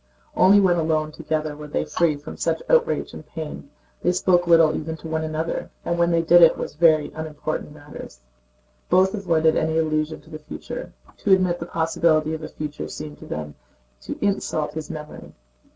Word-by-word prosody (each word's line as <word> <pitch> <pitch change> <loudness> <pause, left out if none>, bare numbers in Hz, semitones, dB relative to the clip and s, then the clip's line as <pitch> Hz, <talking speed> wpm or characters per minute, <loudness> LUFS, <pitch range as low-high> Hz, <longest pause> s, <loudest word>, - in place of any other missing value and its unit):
Only 195 +3 +6
when 185 -3 +3
alone 155 -1 0
together 155 -1 -3
were 150 0 -9
they 75 - -2
free 155 - +1
from 145 - -9
such - - -1
outrage 485 -1 +2
and - - -9
pain. 155 -3 -8 0.3
They 175 - +2
spoke 180 -1 +2
little 165 -2 +5
even 160 +1 -4
to 160 - -9
one 160 0 -2
another, 160 +1 -3 0.2
and 170 0 -1
when 170 0 +3
they 165 -1 +2
did 175 +1 +6
it 165 -1 +7
was - - -5
of 150 - -27
very 155 -3 +4
unimportant 155 -1 -5
matters. 145 - -11 0.7
Both 190 +1 +4
avoided 165 -6 +2
any 160 0 0
allusion 155 -1 0
to 160 - -19
the 155 - -7
future. - - -8 0.3
To 200 - +3
admit 180 -2 +2
the 170 - -6
possibility 160 -1 +1
of 160 - -4
a 155 - -5
future 150 -1 -6
seemed 150 -1 -8
to 155 - -11
them 75 - -5 0.5
to - - -6
insult 155 -6 -1
his 155 -1 -6
memory. 150 -1 -9
160 Hz, 190 wpm, -23 LUFS, 155-170 Hz, 0.7 s, it